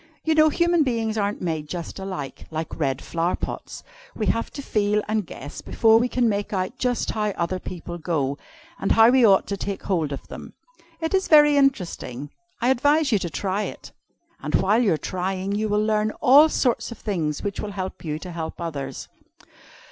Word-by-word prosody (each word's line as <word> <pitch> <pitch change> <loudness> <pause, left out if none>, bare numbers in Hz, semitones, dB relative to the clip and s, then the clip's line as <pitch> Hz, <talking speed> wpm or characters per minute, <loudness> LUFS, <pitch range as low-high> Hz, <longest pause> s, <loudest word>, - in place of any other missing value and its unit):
You 320 - +2
know 310 0 +5
human 340 +2 +2
beings 230 -5 0
aren't 205 -2 -1
made 160 -3 -2
just 175 +1 -6
alike, 185 -8 -6
like 160 +1 -5
red 135 -3 -1
flower 170 +1 -1
pots. - - -6 0.3
We - - -2
have 230 - 0
to 280 - -6
feel 210 -2 +1
and 215 -4 -1
guess 145 +2 -8
before 225 0 +4
we 240 - +1
can 245 -1 +1
make 205 -2 -1
out 185 +4 -2
just 250 -1 0
how 215 -1 -1
other 175 +2 -1
people 175 -1 -7
go, 145 -4 -1 0.4
and 195 - +1
how 225 +1 +7
we 255 0 +5
ought 195 -4 +5
to 200 - -3
take 200 0 -4
hold 165 -7 0
of 140 - -6
them. - - -9 0.5
It 320 +2 -2
is 385 0 +2
very 295 -2 +7
interesting, 175 - 0 0.3
I 245 - +2
advise 290 +3 +3
you 210 - +3
to 175 - -3
try 195 +5 -2
it. - - -7 0.5
And 150 0 -1
while 210 +5 +3
you 210 -8 +3
are - - 0
trying, 185 +3 -3
you 215 +1 -1
will 210 +1 +1
learn 215 0 +1
all 290 +5 +7
sorts 235 -5 0
of 235 - -8
things 165 -8 -2
which 200 -1 -3
will 205 -1 -4
help 190 -1 -5
you 155 -2 -3
to 180 +3 -8
help 165 -1 -5
others." 160 -5 -5
200 Hz, 200 wpm, -24 LUFS, 170-235 Hz, 0.5 s, how